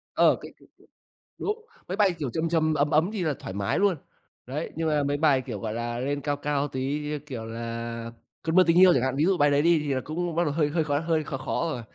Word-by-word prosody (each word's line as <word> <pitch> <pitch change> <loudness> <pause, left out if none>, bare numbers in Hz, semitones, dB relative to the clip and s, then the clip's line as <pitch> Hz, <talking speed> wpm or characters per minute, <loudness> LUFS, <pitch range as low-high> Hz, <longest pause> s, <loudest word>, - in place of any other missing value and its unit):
Ờ, - - +5
cái - - -9
cái - - -20 0.5
cái - - -
đúng, 435 +2 -3 0.2
mấy 185 - -3
bài, 200 -4 +3
kiểu, 145 -4 -2
trầm 160 +6 -1
trầm, 160 -1 +2
ấm 145 0 +1
ấm 160 +4 +3
thì 200 -5 -2
là 155 -3 +1
thoải 95 - -7
mái 100 0 -1
luôn. 200 -2 +3 0.5
Đấy, 145 +6 -4
nhưng 165 0 -1
mà 150 -2 +2
mấy 145 +1 0
bài, 145 -4 +3
kiểu, 120 -6 -6
gọi 110 +1 -4
là, 120 0 -3
lên 140 +3 -2
cao 145 0 -1
cao 145 0 -1
tí 135 +2 -2
như, 150 0 -3
kiểu, 130 -6 -7
là 115 0 -5 0.3
"Cơn 160 0 -1
mưa 185 - +8
tình 170 0 +4
yêu" 185 -1 +8
chẳng 125 - +2
hạn, 130 0 0
ví 150 - +2
dụ 190 0 +2
bài 145 -1 +4
đấy 140 0 +3
đi 170 +1 +4
thì 145 -2 -1
là 130 - -1
cũng 170 +4 -3
bắt 170 - +2
đầu 150 -4 -1
hơi 150 -2 +1
hơi 160 +2 +1
khó 145 -1 0
hơi 160 -1 0
khó 135 -4 -4
khó 165 +5 -2
rồi. 125 -5 -4
150 Hz, 275 wpm, -26 LUFS, 130-165 Hz, 0.5 s, mưa